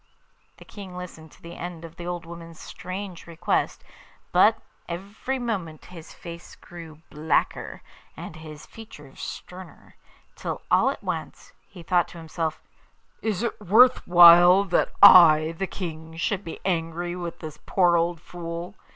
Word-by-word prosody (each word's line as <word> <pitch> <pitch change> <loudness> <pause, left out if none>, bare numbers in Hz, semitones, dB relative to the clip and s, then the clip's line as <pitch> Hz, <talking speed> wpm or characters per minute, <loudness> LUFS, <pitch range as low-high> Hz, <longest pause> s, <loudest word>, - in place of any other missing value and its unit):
The - - -15
King 190 -3 -10
listened 160 -3 -10
to - - -22
the 170 +1 -10
end 170 -1 -7
of 165 0 -13
the 175 0 -8
old 175 -1 -5
woman's 165 -1 -11
strange 185 -1 -8
request, 170 -1 -2 0.5
but - - +4 0.3
every 200 +9 -5
moment 195 - -5
his 165 -2 -11
face 170 0 -11
grew 165 -3 -13
blacker, 155 +1 -2 0.3
and 160 - -9
his 155 -2 -11
features 150 -11 -13
sterner; 180 -1 -10 0.4
till - - -6
all - - +4
at - - -6
once - - -6 0.2
he 180 -4 -13
thought 175 +1 +1
to - - -13
himself, 160 -1 -4 0.6
'Is 220 -1 -2
it 235 - -4
worth 230 +6 +4
while 175 +2 +8
that 185 -3 0
I, 165 -5 +8
the 195 - -1
King, 160 -3 -8
should 195 +4 -2
be 165 - -8
angry 175 -1 -2
with 175 -2 -6
this 155 -2 -10
poor 175 -3 +3
old 170 0 0
fool? 170 +2 -8
170 Hz, 150 wpm, -24 LUFS, 165-185 Hz, 0.6 s, while